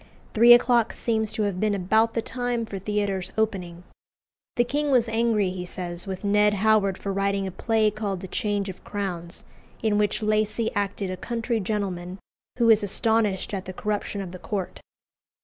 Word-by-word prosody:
Three 235 +2 +7
o'clock 240 -1 +4
seems 220 -2 0
to 215 - 0
have 200 -3 -1
been 210 0 +1
about 220 +4 +2
the 230 - 0
time 245 -1 -2
for 200 -3 -6
theatres 200 -2 -2
opening. 180 -6 -2 0.7
The 240 - +4
king 290 +4 -1
was 245 -4 +3
angry, 225 -4 +1
he 185 -1 -5
says, 175 0 -5
with 190 0 -5
Ned 210 +1 +3
Howard 205 -2 +3
for 195 - -4
writing 195 0 0
a 190 - -4
play 220 +2 +1
called 200 -3 -3
"The 190 - -6
Change 205 0 -1
of 190 - -8
Crowns," 180 -4 -4 0.4
in 210 -2 +2
which 210 +1 0
Lacy 215 +1 0
acted 200 -2 -2
a 185 - -4
country 230 +1 -2
gentleman 185 -3 -3 0.4
who 235 -2 +5
is 220 0 +5
astonished 210 -1 0
at 190 -2 -3
the 185 - -6
corruption 205 0 -3
of 185 -3 -6
the 185 - -9
court. 195 -2 -4
205 Hz, 180 wpm, -25 LUFS, 190-225 Hz, 0.7 s, Three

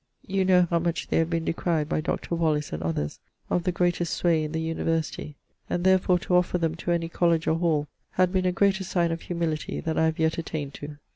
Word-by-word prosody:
You 195 0 0
know 180 -1 +5
how 170 0 +1
much 170 0 -2
they - - +2
have 165 0 +1
been 165 -1 -1
decryed 165 -2 0
by 155 - 0
Dr. 170 - -3
Wallis 155 -3 0
and 75 - -3
others 80 -2 -2 0.3
of 175 - +1
the 180 - +2
greatest 175 -1 0
sway 165 -3 +2
in 155 - -4
the 160 - -2
University, 160 -2 -2 0.3
and 175 - -1
therfore 185 -1 +4
to 180 - 0
offer 180 0 +1
them 165 -2 0
to 170 - -5
any 170 -1 +1
Colledge 170 -1 +1
or 160 - +1
Hall 155 -4 +1 0.3
had 185 0 +2
been 185 -1 +2
a - - +3
greater 190 +1 +2
signe 170 -2 0
of 165 - -3
humility 170 -3 -2
than 160 -1 -1
I 160 - +4
have 160 0 0
yet 160 +1 +1
attained 150 -4 -4
to. 145 0 -8
165 Hz, 230 wpm, -26 LUFS, 160-175 Hz, 0.3 s, know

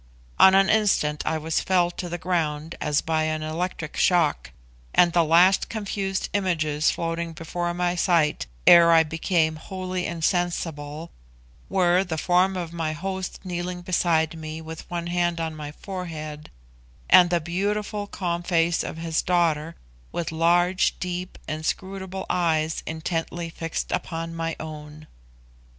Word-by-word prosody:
On 190 - +8
an 195 0 +5
instant 190 -9 +2
I 160 - +1
was 160 +1 -1
felled 175 -2 +1
to 175 - -3
the 175 - -3
ground 165 -3 -2
as 150 -1 +1
by 160 -1 0
an 155 0 -2
electric 160 0 -4
shock, 170 -5 +2 0.5
and 175 -1 +5
the 170 - +4
last 175 +4 +4
confused 200 -3 -2
images 155 -6 +1
floating 165 0 -3
before 175 +1 -3
my 175 0 0
sight 165 - +1 0.2
ere 170 -1 +8
I 165 -1 +6
became 160 0 0
wholly 185 +1 -4
insensible, 165 -2 -2 0.6
were 180 -1 +3
the 170 -4 -4
form 185 +3 +2
of 170 -2 -5
my 160 -2 -2
host 190 +3 -5
kneeling 180 0 -4
beside 165 -3 +1
me 155 0 -6
with 160 0 -9
one 170 -1 -3
hand 175 -1 0
on 160 -1 -3
my 150 -1 -7
forehead, 155 -4 -7 0.6
and 180 -1 +7
the 175 -1 +2
beautiful 205 +5 -2
calm 175 -3 -3
face 170 -1 +1
of - - -6
his 165 -1 -1
daughter, 165 -3 +1 0.4
with 170 - -3
large, 175 +3 +2
deep, 180 0 -4
inscrutable 190 +5 -4
eyes 160 -2 0
intently 165 +1 -3
fixed 165 0 -4
upon 165 -1 -3
my 165 0 -3
own. 155 -1 -8
170 Hz, 140 wpm, -24 LUFS, 160-180 Hz, 0.6 s, On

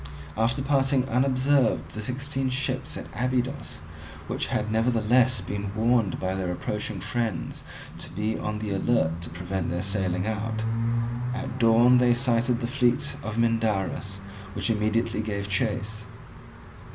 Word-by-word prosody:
After 115 +5 +1
passing 135 -2 +2
unobserved 130 +1 +2
the 105 - -5
sixteen 135 +3 -2
ships 130 +1 -2
at - - -6
Abydos, 125 +3 -1 0.5
which - - -2
had 110 0 -1
nevertheless 120 +2 +3
been 100 0 -4
warned 115 -3 +2
by 95 0 -1
their 95 -2 -2
approaching 105 +2 -3
friends 105 -1 -3 0.4
to - - -7
be 105 +4 -2
on 105 0 -3
the 105 -1 -3
alert 95 -5 +1
to 80 - -6
prevent 90 +2 -3
their 85 +1 -2
sailing 95 -2 0
out, 110 0 -2 0.7
at 130 0 -4
dawn 120 +2 +6
they 120 -1 +4
sighted 120 0 +2
the - - 0
fleet 125 +1 +1
of 105 0 -4
Mindarus, 110 -3 0 0.3
which - - 0
immediately 110 +1 +1
gave 100 -2 -3
chase. 105 +1 -1
115 Hz, 140 wpm, -26 LUFS, 105-125 Hz, 0.7 s, dawn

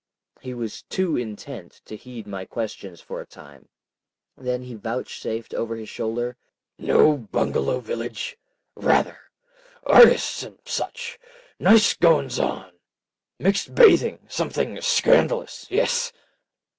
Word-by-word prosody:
He 125 -1 -7
was 115 -3 -6
too 185 -4 -1
intent 110 -3 -7
to 110 - -9
heed 120 0 -10
my 95 -2 -6
questions 100 -4 -6
for - - -7
a - - -11
time. 70 -2 -17 0.7
Then 125 -1 -3
he 125 -1 -9
vouchsafed 115 0 -5
over 115 0 -3
his 110 -1 -8
shoulder— 120 +2 -3 0.4
"Know 150 - +4
Bungalow 110 - -1
village?—rather. 470 - -3 0.6
Artis' 480 - +6
and - - -10
such. 475 0 -5 0.4
Nice 220 -1 +6
goings 155 -7 +2
on! 95 -1 -2 0.7
Mixed 195 +2 0
bathing—something 485 +1 +3
scandalous. - - +2
Yes." 485 +4 +1
125 Hz, 105 wpm, -23 LUFS, -, 0.7 s, Artis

